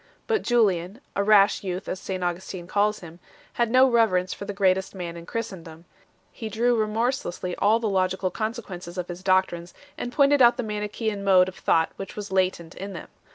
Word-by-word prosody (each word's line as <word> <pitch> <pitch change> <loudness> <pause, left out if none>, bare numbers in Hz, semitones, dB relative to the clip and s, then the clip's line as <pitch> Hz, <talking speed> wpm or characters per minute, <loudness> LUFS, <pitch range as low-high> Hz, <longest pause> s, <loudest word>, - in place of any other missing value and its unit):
But 445 -2 +1
Julian 200 -4 +1 0.2
a 200 - +1
rash 205 -1 +4
youth, 185 0 -4
as 185 - -3
St 185 -1 -4
Augustin 175 0 -4
calls 205 +3 0
him 170 0 -11 0.3
had 235 -1 +1
no 255 +2 +6
reverence 215 -7 +2
for 200 - -8
the 205 - -4
greatest 190 -1 +1
man 175 -2 -5
in 170 0 -10
Christendom; 170 -7 -6 0.5
he 220 -3 -6
drew 240 +2 +2
remorselessly 215 -4 -1
all 215 +3 +3
the 230 - -1
logical 185 -1 0
consequences 200 -6 -5
of 180 0 -4
his 175 +1 -7
doctrines, 185 -2 0 0.2
and 245 - -4
pointed 280 +1 +4
out 240 0 +6
the 250 - -2
Manichaean 210 0 -3
mode 185 -2 +5
of 185 - -7
thought 160 0 +1
which 195 - -7
was 205 -2 -6
latent 185 -3 0
in 195 +1 -7
them. 170 - -9
195 Hz, 190 wpm, -25 LUFS, 180-220 Hz, 0.5 s, no